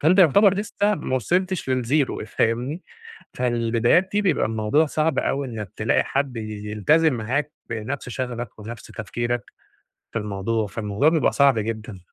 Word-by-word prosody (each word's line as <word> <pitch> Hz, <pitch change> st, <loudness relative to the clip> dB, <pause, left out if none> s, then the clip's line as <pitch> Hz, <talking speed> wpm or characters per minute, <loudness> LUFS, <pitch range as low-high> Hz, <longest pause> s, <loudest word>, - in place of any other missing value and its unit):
فأنت 170 Hz, +6 st, +4 dB
يعتبر 195 Hz, +3 st, +6 dB
لسه 205 Hz, +1 st, 0 dB
ما 140 Hz, -5 st, -2 dB
وصِلِتش 180 Hz, -, 0 dB
للzero 130 Hz, 0 st, 0 dB
فاهمني؟ 125 Hz, +11 st, -1 dB, 0.5 s
فالبدايات 120 Hz, +8 st, +2 dB
دي 210 Hz, -, +2 dB
بيبقى 185 Hz, -, +2 dB
الموضوع 110 Hz, +8 st, +2 dB
صعب 155 Hz, -1 st, 0 dB
أوي 140 Hz, 0 st, -1 dB
إنك 105 Hz, -5 st, -6 dB
تلاقي -, -, +2 dB
حد 135 Hz, -3 st, -2 dB
ي -, -, -3 dB, 0.3 s
يلتزم 150 Hz, -, +3 dB
معاك 130 Hz, +6 st, -1 dB, 0.2 s
بنفس 120 Hz, +4 st, -4 dB
شغفك 120 Hz, -2 st, -5 dB
وبنفس 115 Hz, +2 st, -8 dB
تفكيرك 120 Hz, +2 st, -3 dB, 0.7 s
في -, -, -1 dB
الموضوع. 105 Hz, +1 st, -2 dB
فالموضوع 105 Hz, +6 st, 0 dB
بيبقى 160 Hz, -1 st, +3 dB
صعب 140 Hz, -5 st, +4 dB
جدًا. 110 Hz, -2 st, -4 dB
125 Hz, 145 wpm, -23 LUFS, 115-155 Hz, 0.7 s, يعتبر